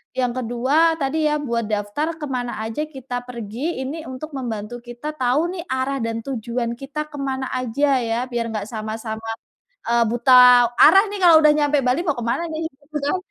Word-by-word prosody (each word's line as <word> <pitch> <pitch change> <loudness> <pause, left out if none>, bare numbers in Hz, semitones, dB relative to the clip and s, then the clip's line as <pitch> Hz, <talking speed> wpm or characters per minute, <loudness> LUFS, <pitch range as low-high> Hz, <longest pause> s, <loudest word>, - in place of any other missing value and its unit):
yang 250 -2 0
ke-2 250 +3 -1 0.2
tadi, 295 +3 -1
ya 300 - +1
buat 235 -3 -1
daftar 205 +9 -1
ke - - -8
mana 245 -1 -3
aja 225 +7 -3
kita 265 -4 -6
pergi, 245 +6 -4
ini 315 +4 -5
untuk 260 +5 -7
membantu 230 -3 -4
kita 240 +4 -8
tahu 255 +1 +1 0.2
nih - - -4
arah 260 +1 -1
dan 230 0 -2
tujuan 235 -2 -3
kita 285 +4 -5
ke 300 - -13
mana 265 -1 -2
aja 270 +3 +1
ya, 225 0 -1
biar 235 -2 -3
nggak 210 -1 -4
sama-sama, 220 0 -5 0.6
eee, 235 0 +2
buta 240 +2 +2 0.5
arah 390 +1 +8
nih 405 - -4
kalau 340 -2 +7
udah 300 - +7
nyampe 295 -1 +2
Bali, 255 +7 +2
mau 300 -7 -1
ke 240 - -4
mana 240 +7 0
gitu 320 -2 -4 0.3
kan. 370 - +1
255 Hz, 185 wpm, -21 LUFS, 235-290 Hz, 0.6 s, arah